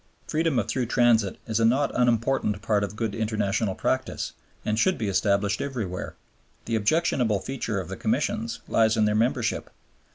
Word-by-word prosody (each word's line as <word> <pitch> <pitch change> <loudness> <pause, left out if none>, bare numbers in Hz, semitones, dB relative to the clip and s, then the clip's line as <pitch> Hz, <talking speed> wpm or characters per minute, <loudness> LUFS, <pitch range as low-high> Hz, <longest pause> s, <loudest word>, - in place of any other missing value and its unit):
Freedom 160 -3 0
of 110 -2 +1
through 125 +1 -1
transit 115 -5 +3
is 110 -1 -1
a - - +2
not 130 +5 +3
unimportant 120 -3 +1
part 105 -2 +1
of 100 +1 -4
good 110 -2 -2
international 105 -2 -1
practice - - -2 0.3
and 105 +1 0
should 185 +9 +3
be 110 - -2
established 100 +1 +1
everywhere. 110 -10 -4 0.5
The 115 - -1
objectionable 115 - +2
feature 115 -4 -3
of 95 - -5
the - - -6
Commissions 115 +1 -1
lies 110 0 +3
in 110 - +4
their 105 - +2
membership. 115 +1 0
110 Hz, 165 wpm, -26 LUFS, 105-120 Hz, 0.5 s, in